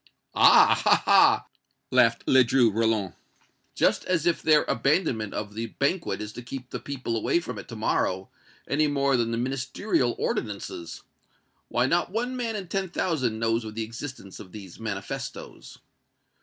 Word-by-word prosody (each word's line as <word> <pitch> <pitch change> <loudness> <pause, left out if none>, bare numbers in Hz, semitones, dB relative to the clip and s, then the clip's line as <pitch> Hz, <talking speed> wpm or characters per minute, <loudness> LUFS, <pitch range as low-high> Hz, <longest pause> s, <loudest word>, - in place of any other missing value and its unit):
"Ah! - - +6
ha! - - +4
ha!" - - +5 0.5
laughed - - +3
Ledru 130 -2 +4
Rollin; 110 -4 0 0.6
"just - - +2
as 170 -3 0
if 170 -1 +1
their 155 -1 +4
abandonment 135 - 0
of 105 0 -5
the 115 +2 -4
banquet 140 - -2
is 105 0 -8
to - - -8
keep 125 +1 -8
the - - -4
people 130 -4 -4
away 115 +9 +1
from 175 - -7
it - - -10
to 115 - -8
morrow, 95 -3 -1 0.4
any 155 +1 +2
more 140 -1 +1
than 120 -2 0
the 115 - -2
Ministerial 130 - -1
ordinances! 100 -5 -4 0.6
Why, 120 - +1
not 170 +6 +1
one 240 +6 -2
man 235 -3 -3
in 195 -3 -5
ten 190 +1 -2
thousand 130 -11 -1
knows 115 +1 0
of 110 -1 -8
the 115 - -2
existence 115 -3 -8
of 95 - -11
these 95 -5 -10
manifestoes! 100 -4 -6
120 Hz, 160 wpm, -26 LUFS, 110-150 Hz, 0.6 s, Ah